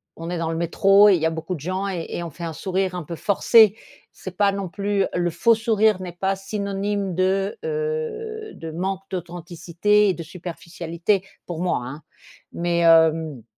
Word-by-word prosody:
on 165 +1 -7
est 175 - -2
dans 165 -1 -2
le - - -3
métro 195 +4 +5
et 190 - +6
il 160 - -2
y - - +1
a 160 - +3
beaucoup 165 +3 -4
de 155 - -9
gens 185 +5 -3
et 175 -3 -4
et 175 - -4
on 170 - -5
fait 170 +3 -8
un 165 - -4
sourire 185 +2 -2
un 175 - -4
peu 170 +3 -6
forcé. 215 +1 +5 0.4
C'est 185 -1 -9
pas 200 -1 +3
non 195 -2 -4
plus 200 +1 0
le 175 -1 0
faux 230 +7 +3
sourire 220 -3 +2
n'est 180 -2 -6
pas 190 +2 -1
synonyme 200 -1 -3
de, 195 +2 0
heu, 460 -2 -3
de 165 -1 -8
manque 190 +3 -3
d'authenticité 175 +3 0
et - - +2
de 170 - -7
superficialité, 170 +2 -3 0.2
pour 170 -2 -6
moi, 180 -8 0
hein. 135 +5 -8 0.5
Mais 170 0 0
hem 160 -5 +4
185 Hz, 195 wpm, -23 LUFS, 170-200 Hz, 0.5 s, et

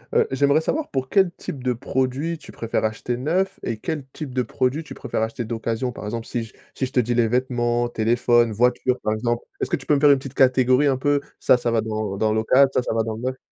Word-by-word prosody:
Heu, 465 -1 +4
j'aimerais 140 +3 +3
savoir 300 - -2
pour 130 -1 -3
quel 190 -3 +3
type 135 -4 -7
de 125 -1 +1
produit 130 +7 -2
tu - - -13
préfères 115 -1 -2
acheter 110 +3 -2
neuf 175 +9 -1
et 115 - -2
quel 145 +4 -4
type 145 -5 -7
de 130 - +1
produit 130 +5 -1
tu 150 - -10
préfères - - -4
acheter 110 +2 -2
d'occasion? 115 +2 -2
Par 105 - -8
exemple, 115 +2 -4
si 120 -2 -2
je 110 - -12 0.2
si 130 - -2
je 130 - -7
te 125 - +3
dis 120 +1 -1
les 120 -1 +3
vêtements, 120 0 0
téléphone, 120 +1 +2
voiture 125 +3 +2
par 110 - +1
exemple? 120 +2 -1 0.2
Est-ce - - -1
que 175 - +2
tu 155 - -9
peux 150 - +3
me 140 - +1
faire 145 -1 +6
une 140 - +5
petite 135 -1 -8
catégorie 130 +1 +4
un 135 - +2
peu. 145 +1 +1 0.2
Ça, - - +4
ça 120 - -1
va 115 -1 +2
dans 110 -2 -3
dans 110 0 +1
local, 130 +5 +4
ça, - - +2
ça 120 - -3
va 115 - +1
dans 110 0 -4
le 110 - -8
neuf 130 +1 -3
125 Hz, 255 wpm, -23 LUFS, 115-140 Hz, 0.2 s, faire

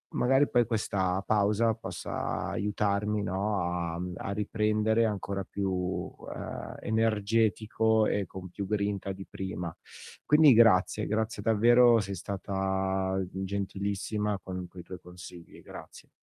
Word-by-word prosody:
magari 135 +3 +3
poi 120 -1 +3
questa 100 -4 -1
pausa 105 +2 +2
possa - - -4
aiutarmi, 105 +1 0
no, 100 +1 -1
a 85 -1 -2
mhmm, 90 0 -4
a - - -4
riprendere 105 +2 +1
ancora 100 -2 -2
più, 95 -2 -2 0.2
ehm, - - -6
energetico 110 0 +2
e 100 -1 0
con 95 +1 -9
più 100 +2 -5
grinta 100 -1 -1
di 95 +1 -9
prima. 90 -3 -5 0.5
Quindi 150 -1 +7
grazie, 110 -2 +4
grazie 110 -1 -1
davvero, 120 +2 +5
sei 100 -1 -5
stata 95 0 -1
gentilissima 100 +2 -2
con 90 -1 -5
quei 90 0 -11
tuoi 90 +1 -9
consigli. 90 -1 -12
Grazie. - - -12
100 Hz, 120 wpm, -29 LUFS, 95-110 Hz, 0.5 s, Quindi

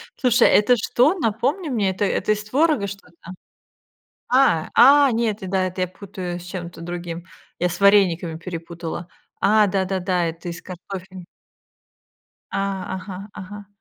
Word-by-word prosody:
Слушай, 245 -3 +4
это 245 +4 +5
что? 250 - +3
Напомни 275 - -1
мне, 210 -6 +1
это 190 +2 -1
это 195 +2 0
из 210 0 -1
творога 265 -2 +1
что-то? 180 -3 -11 1.0
А, 250 -12 +3
а, 280 +2 +7
нет, 225 -2 0
это 185 - -5
да, 190 -1 +1
это 185 0 -3
я 180 - 0
путаю 180 -2 -7
с - - -11
чем-то 175 -2 -7
другим. 175 0 -6 0.3
Я 180 - +1
с - - -5
варениками 180 -5 +3
перепутала. 170 0 -6 0.3
А, 215 0 +4
да-да-да, 185 -2 0
это 165 +2 -6
из 170 0 -7
картофеля. 185 0 -9 1.3
А, 195 -1 -2
ага, 190 +2 -8
ага. 205 +1 -9
190 Hz, 145 wpm, -22 LUFS, 175-215 Hz, 1.3 s, а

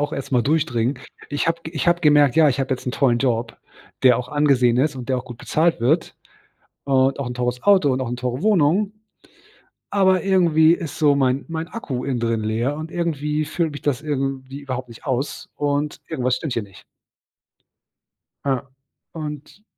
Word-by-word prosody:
auch 145 +1 -1
erstmal 130 -2 0
durchdringen. 135 -4 0 0.3
Ich 145 +2 -1
habe 165 0 0
ich 160 +1 -2
habe 175 0 +3
gemerkt: 145 -4 +4
„Ja, 160 -2 +6
ich 135 0 0
habe 135 0 -1
jetzt 130 - -5
'n 125 - -1
tollen 125 -4 +2
Job, 115 -3 -1 0.5
der 125 -2 +6
auch 125 0 -5
angesehen 135 -5 +3
ist 145 +3 +1
und 125 0 -7
der 130 -1 +1
auch - - -8
gut 120 -2 -10
bezahlt 160 0 +1
wird 155 +8 +1 0.7
und 135 0 +2
auch 140 - -2
'n 125 - -4
teures 125 0 -2
Auto 190 -8 +5
und 130 +1 -1
auch 125 - -3
'ne 125 - -2
teure 125 +2 -3
Wohnung. 195 +1 +2 1.0
Aber 190 -2 +3
irgendwie 170 -4 +4
ist 160 -3 -5
so 145 -2 +4
mein 135 0 +1
mein 165 0 -4
Akku 140 - -5
innen 130 -3 -2
drin 115 -1 0
leer 115 +6 -1
und 160 +2 -7
irgendwie 155 -3 -1
füllt 165 0 -1
mich 145 - -8
das 140 -3 -1
irgendwie 135 -2 -3
überhaupt 130 -3 -5
nicht 115 +4 -13
aus 135 +1 -3
und 145 0 -1
irgendwas 125 -1 0
stimmt 155 -6 -4
hier 115 - -1
nicht.“ 100 -2 -16 1.6
Ja. 135 -1 -1 0.4
Und 150 +4 -8
140 Hz, 185 wpm, -22 LUFS, 125-155 Hz, 1.6 s, Ja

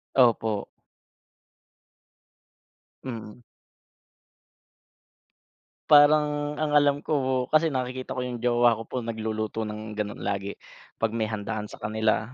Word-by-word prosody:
Opo. 110 -5 +3 2.4
Mm. 115 -2 -7 2.5
Parang, 150 0 +5
ang 155 -1 -1
alam 145 -1 +4
ko - - -5
po, 130 0 0 0.2
kasi 160 +1 +5
nakikita 130 -1 -4
ko 125 - -1
'yung 120 -2 -5
jowa 120 -1 +4
ko 115 0 -5
po, - - -7
nagluluto 110 -1 -3
ng 105 0 -7
gano'n 105 -1 -4
lagi, 100 0 -3 0.4
pag 115 -1 0
may 110 -2 -1
handaan 105 0 -4
sa - - -11
kanila. 110 +2 -1
115 Hz, 110 wpm, -26 LUFS, 110-130 Hz, 2.5 s, Parang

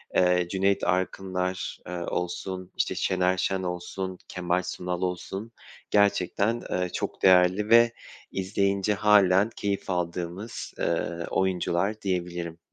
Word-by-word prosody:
eee, 90 -1 +3
Cüneyt 100 +1 +1
Arkınlar, 95 0 -1
eee, 90 - -5
olsun, 90 +1 -4
işte, - - 0
Şener 95 0 +1
Şen 95 0 0
olsun, 90 +1 -4
Kemal 90 0 -1
Sunal 90 0 -4
olsun 95 +4 -3 0.4
gerçekten, 100 +2 +2
eee, 90 0 0
çok - - -4
değerli 95 +3 +5
ve 115 0 +6 0.4
izleyince 100 +1 0
hâlen 100 -1 +5
keyif 100 -1 -2
aldığımız, 90 +4 -3
eee, 85 - +1 0.3
oyuncular 95 +2 0
diyebilirim. 90 -3 -3
95 Hz, 115 wpm, -27 LUFS, 90-100 Hz, 0.4 s, ve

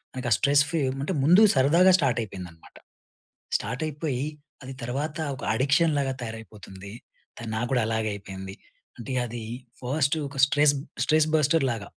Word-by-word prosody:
మనకి 125 -2 -3
stress 140 0 +4
free 165 0 -1 0.2
అంటే 165 +6 -2
ముందుగ 180 +8 +7
సరదాగా 165 +8 +5
స్టార్ట్ 135 -8 +1
అయిపోయిందనమాట. 90 -6 -10 0.8
స్టార్ట్ 125 +7 -5
అయిపోయి 145 -3 -3 0.4
అది 130 +1 -8
తర్వాత 145 +6 -3 0.2
ఒక - - -11
అడిక్షన్‌లాగా 140 +1 +2
తయారైపోతుంది. 105 -4 -9 0.5
తను, 115 -1 -7
నాకు 120 +2 -2
కూడా 125 -3 +2
అలాగే 110 -1 -1
అయిపోయింది. 95 -1 -9 0.4
అంటే 125 +2 -6
అది 120 0 -6 0.4
ఫస్ట్ 140 +3 0
ఒక 140 - -11
స్ట్రెస్, 145 0 +3
బ్ - - -8 0.2
స్ట్రెస్ 155 0 +3
బస్టర్‌లాగ. 135 -7 +1
130 Hz, 140 wpm, -26 LUFS, 110-150 Hz, 0.8 s, ముందుగ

